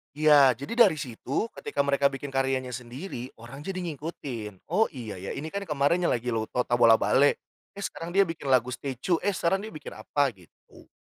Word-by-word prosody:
Iya 145 -4 +6
jadi 140 - -6
dari 160 - -1
situ 140 - -3
ketika 145 -10 -1
mereka 140 0 +3
bikin 135 0 -6
karyanya 135 -1 0
sendiri 125 +2 -6
orang 125 +4 -10
jadi 185 +4 -4
ngikutin, 135 - -6
"Oh 220 +5 +4
iya 110 - -7
ya 95 - -6
ini 155 +2 -5
kan 200 0 -4
kemarin 150 +4 +2
yang - - +3
lagi 120 +1 -3
lo 110 -1 -1
to 125 - 0
Tabola 120 -2 +5
Bale. 140 +5 +3 0.4
Eh 200 - -6
sekarang 165 -2 -5
dia 200 - +7
bikin 165 -5 -6
lagu 125 -1 +3
Stecu. 140 +7 -2
Eh 205 +2 +1
sekarang 180 +3 +1
dia 220 +1 -7
bikin - - -9
apa," 140 -3 0
gitu. 90 -4 -20
140 Hz, 195 wpm, -27 LUFS, 125-165 Hz, 0.4 s, dia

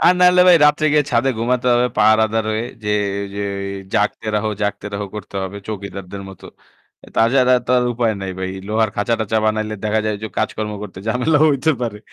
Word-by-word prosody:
আর 180 - +6
না 180 - +5
হলে 180 0 +5
ভাই, 175 - +8
রাত্রে 150 +1 +2
গিয়ে 150 -1 +3
ছাদে 120 +2 +2
ঘুমাতে 125 +2 0
হবে, 120 +1 +3
পাহারাদার 110 +1 +3
হয়ে 110 +2 -1 0.2
গিয়ে 105 0 +1 0.4
যে 100 - -4 0.5
'জাগতে 105 +1 0
রহো, 110 +1 0
জাগতে 105 0 -2
রহো' 100 0 -4
করতে 105 -1 -8
হবে 95 +1 -5
চৌকিদারদের 100 -2 -7
মতো। 95 - -12 0.6
অ্যা - - -14
তা - - +2
ছাড়া 130 -1 +5
তো - - -2
আর 125 - +1
উপায় 115 -2 0
নাই 95 -1 -4
ভাই। 95 0 -3 0.2
লোহার 110 0 +1
খাঁচা-টাচা 110 +1 0
বানাইলে 110 0 -1
দেখা 110 +1 +1
যায় 105 - 0
যে - - -2
কাজকর্ম 105 -1 -2
করতে 95 -3 -8
ঝামেলাও 145 +6 +2
হইতে 140 +3 +1
পারে। 115 -4 -3
110 Hz, 200 wpm, -19 LUFS, 105-125 Hz, 0.6 s, ভাই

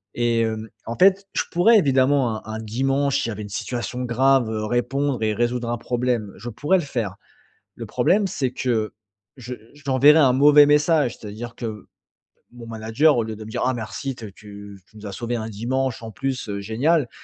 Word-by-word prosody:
Et 120 -1 +1
heu, 110 0 -4 0.2
en 115 - -3
fait, 195 +1 +4
je - - 0
pourrais 210 +7 +5
évidemment, 135 - +2
un 110 - -5
un 110 - -4
dimanche, 135 +5 0
s'il - - -2
y - - -3
avait 105 0 -6
une 105 - -8
situation 125 +4 -4
grave, 125 0 +2
heu, 110 -1 -3
répondre 130 +3 -1
et 110 -1 +1
résoudre 120 0 -1
un 120 - -1
problème. 120 -3 -2
Je 120 +5 -7
pourrais 145 - +1
le 170 - -3
faire. 115 -9 -4 0.6
Le - - -8
problème, 200 +2 +2
c'est 135 -8 -2
que 115 -4 -1 0.5
je 125 0 -6 0.2
j'enverrais 145 +1 +4
un 135 -5 +5
mauvais 145 +2 +7
message. 150 -3 +3
C'est-à-dire 110 +3 -8
que, 110 -3 -6 0.7
mon 120 -1 -11
manager 115 +6 +2
au 115 - +1
lieu 110 0 -5
de 110 - -9
me 110 - -10
dire: - - -4
«Ah 130 - +1
merci 120 +4 -5
tu 115 - -12
as 105 - -9
tu 100 -1 -12
tu - - -27
nous 105 - -11
as 100 - -5
sauvés 120 +4 -4
un 110 -1 -4
dimanche, 125 +4 -2
en 115 - -7
plus. 130 -1 -3
Heu, 100 0 -3
génial.» 125 +6 +1
120 Hz, 205 wpm, -22 LUFS, 110-135 Hz, 0.7 s, mauvais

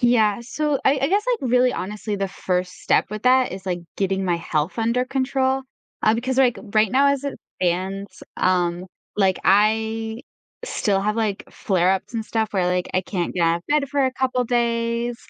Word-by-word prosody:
Yeah. 230 -4 +3
So, 285 +4 -1
I 270 - +5
I 275 - +2
guess, 400 +4 +2 0.2
like, 255 - -2
really 250 0 +4
honestly, 205 +2 -4
the 195 -1 -2
first 180 -1 -3
step - - +2
with 215 0 -5
that 255 0 +4
is, 190 0 -8
like, 175 -1 -2 0.2
getting 195 -1 0
my 175 -2 +1
health 160 +4 -2
under 235 +3 +1
control, 265 0 0 0.4
uh, 215 - +4
because, 255 +3 -2
like, 250 -3 +3 0.2
right 215 -1 +4
now 275 +4 +4
as 280 0 0
it 280 - -4 0.2
stands, 185 +2 -2
um, 180 -1 +1 0.3
like, 195 -2 +2
I 220 +3 +2 0.4
still 200 - 0
have, 210 +2 -1
like, 215 -3 -1
flare 185 -2 +1
ups 190 +5 -4
and 225 -1 -2
stuff 220 -1 -1
where, 185 -3 +1
like, 180 0 0
I 185 - +3
can't 180 -2 -3
get 180 - 0
out 165 0 +3
of - - -20
bed 290 -2 +2
for 280 -1 +1
a 260 - 0
couple 255 -1 0
days. 235 0 0
220 Hz, 195 wpm, -22 LUFS, 190-250 Hz, 0.4 s, I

